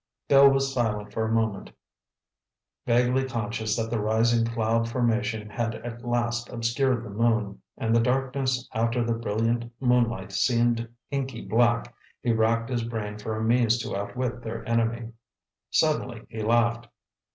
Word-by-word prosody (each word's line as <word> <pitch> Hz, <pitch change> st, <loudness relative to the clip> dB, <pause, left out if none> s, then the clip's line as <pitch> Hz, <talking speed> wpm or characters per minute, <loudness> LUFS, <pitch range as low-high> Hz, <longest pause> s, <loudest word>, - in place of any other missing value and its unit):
Bill 140 Hz, 0 st, +8 dB
was 135 Hz, 0 st, +1 dB
silent 105 Hz, -4 st, -1 dB
for 110 Hz, -, 0 dB
a 110 Hz, -, -2 dB
moment. 110 Hz, -3 st, 0 dB, 1.2 s
Vaguely 125 Hz, +2 st, +3 dB
conscious 110 Hz, -3 st, -2 dB
that 115 Hz, 0 st, -2 dB
the 115 Hz, -, 0 dB
rising 115 Hz, +2 st, +2 dB
cloud 115 Hz, 0 st, 0 dB
formation 115 Hz, -2 st, 0 dB
had 115 Hz, +1 st, -2 dB
at 120 Hz, +1 st, -8 dB
last 120 Hz, -1 st, -1 dB
obscured 120 Hz, +1 st, 0 dB
the 110 Hz, -, -8 dB
moon, 110 Hz, -2 st, 0 dB, 0.2 s
and 115 Hz, 0 st, +1 dB
the -, -, +5 dB
darkness 130 Hz, +1 st, 0 dB
after 115 Hz, +1 st, +1 dB
the 115 Hz, 0 st, 0 dB
brilliant 115 Hz, +1 st, -1 dB
moonlight 120 Hz, -6 st, +1 dB
seemed 115 Hz, +3 st, +1 dB, 0.2 s
inky 135 Hz, -1 st, -3 dB
black, 120 Hz, 0 st, +2 dB, 0.3 s
he 120 Hz, -, +2 dB
wracked 115 Hz, +2 st, +1 dB
his 120 Hz, -2 st, 0 dB
brain 105 Hz, -2 st, -4 dB
for 110 Hz, +1 st, -4 dB
a 110 Hz, -, -2 dB
means 120 Hz, 0 st, +3 dB
to -, -, -4 dB
outwit 120 Hz, +4 st, -3 dB
their 115 Hz, 0 st, -6 dB
enemy. 115 Hz, 0 st, 0 dB, 0.6 s
Suddenly 130 Hz, -7 st, 0 dB
he 110 Hz, -1 st, -5 dB
laughed. 120 Hz, +1 st, +2 dB
115 Hz, 150 wpm, -26 LUFS, 110-120 Hz, 1.2 s, Bill